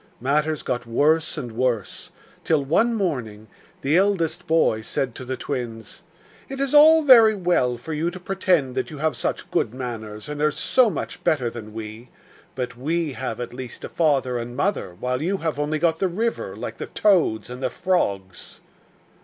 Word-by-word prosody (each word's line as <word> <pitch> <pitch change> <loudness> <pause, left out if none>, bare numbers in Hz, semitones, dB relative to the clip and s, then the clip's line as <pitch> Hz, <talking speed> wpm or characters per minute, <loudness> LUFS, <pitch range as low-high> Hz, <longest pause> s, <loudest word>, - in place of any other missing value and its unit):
Matters 150 +4 0
got 125 -2 -3
worse 155 +8 +2
and 125 -6 -5
worse 115 -3 -2 0.3
till, 155 -4 +1
one 230 - +2
morning, 120 - -3 0.3
the 145 +5 +2
eldest 190 -4 +1
boy 160 -9 +2
said 125 +2 -2
to 130 - -8
the 130 +1 -4
twins: 115 -5 -6 0.5
'It 270 0 -6
is 275 0 -1
all 315 +2 +8
very 230 -6 +7
well 170 -10 +1
for 155 +7 -7
you 160 +3 0
to 180 +1 -9
pretend 180 -8 +1
that 130 0 -2
you 155 - -8
have 155 -1 0
such - - -3
good 110 - 0
manners, 110 -3 -6
and 150 0 -5
are 150 - +4
so 240 - +2
much 165 - -5
better 125 -7 +1
than 110 -2 -9
we, 110 +2 -8 0.5
but 125 -1 -4
we 155 +5 -1
have 125 -3 -4
at 120 -1 -5
least 125 -1 -8
a - - -5
father 135 -6 +1
and 120 +1 -7
mother, 120 - -1
while 125 +1 -2
you 190 +5 0
have 160 -4 -3
only 150 +1 0
got 165 0 +1
the 190 - +2
river, 185 - -2
like 115 +1 -6
the - - -6
toads 175 - +2
and 125 +1 -7
the 130 - 0
frogs. 100 - -2
140 Hz, 185 wpm, -23 LUFS, 120-170 Hz, 0.5 s, all